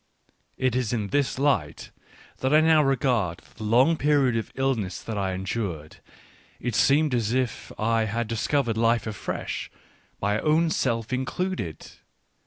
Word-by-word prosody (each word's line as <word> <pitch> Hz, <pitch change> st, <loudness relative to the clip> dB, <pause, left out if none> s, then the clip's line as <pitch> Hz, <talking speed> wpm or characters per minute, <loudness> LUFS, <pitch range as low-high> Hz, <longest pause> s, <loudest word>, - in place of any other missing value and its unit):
It 130 Hz, -2 st, 0 dB
is 125 Hz, -3 st, 0 dB
in 105 Hz, -4 st, -2 dB
this 140 Hz, +1 st, 0 dB
light 135 Hz, -, 0 dB, 0.5 s
that 130 Hz, -, -1 dB
I 155 Hz, -, +6 dB
now 160 Hz, -1 st, +5 dB
regard 125 Hz, -, +1 dB, 0.2 s
the 110 Hz, -, -7 dB
long 125 Hz, +10 st, +4 dB
period 140 Hz, -5 st, +2 dB
of 115 Hz, -, -3 dB
illness 125 Hz, -9 st, -1 dB
that 110 Hz, -, -5 dB
I 95 Hz, -2 st, -1 dB
endured: 90 Hz, -5 st, -4 dB, 0.6 s
it 120 Hz, -, -3 dB
seemed 145 Hz, +5 st, +3 dB
as 115 Hz, -2 st, 0 dB
if 130 Hz, -2 st, -2 dB
I 115 Hz, 0 st, +1 dB
had 115 Hz, +2 st, -2 dB
discovered 115 Hz, +1 st, 0 dB
life 115 Hz, +1 st, +2 dB
afresh, 110 Hz, -2 st, -4 dB, 0.5 s
my 105 Hz, +2 st, 0 dB
own 160 Hz, +4 st, +2 dB
self 115 Hz, -4 st, -1 dB
included. 130 Hz, -, -3 dB
120 Hz, 145 wpm, -25 LUFS, 110-135 Hz, 0.6 s, I